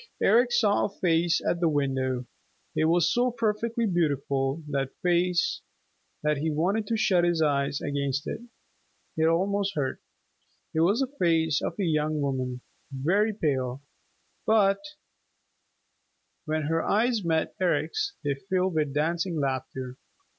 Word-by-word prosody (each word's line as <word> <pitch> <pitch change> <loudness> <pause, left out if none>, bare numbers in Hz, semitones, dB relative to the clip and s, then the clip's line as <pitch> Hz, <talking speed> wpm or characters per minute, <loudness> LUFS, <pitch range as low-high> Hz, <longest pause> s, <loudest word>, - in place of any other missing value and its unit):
Eric 240 +4 +4
saw 220 -4 +3
a - - -2
face 170 -3 +1
at 175 - +1
the 170 -2 +3
window. 130 -3 -1 0.5
It 155 - +2
was 165 0 +3
so 245 +1 +2
perfectly 230 0 -1
beautiful, 140 -5 0
that 135 -2 -1
face, 175 0 +1 0.6
that 150 -1 +1
he 155 +3 -1
wanted 190 +8 0
to 225 - 0
shut 185 -5 +3
his 175 -1 +2
eyes 140 -2 +1
against 140 -1 -2
it. - - -4 0.7
It 160 0 +2
almost 195 +3 +1
hurt. 135 -3 -2 0.7
It 160 - 0
was 200 +10 +3
the 270 - +1 0.2
face 160 -3 +2
of - - -2
a 200 - -1
young 155 -2 0
woman, 130 -3 -2 0.3
very 180 +11 +1
pale, 140 - -2 0.6
but 200 -3 +4 1.7
when 155 0 -1
her 165 +2 0
eyes 225 0 +1
met 160 -2 0
Eric's 400 - 0
they 145 -1 +1
filled 185 +5 -1
with 150 -3 -1
dancing 165 +2 0
laughter. 130 -1 -3
165 Hz, 140 wpm, -27 LUFS, 140-195 Hz, 1.7 s, Eric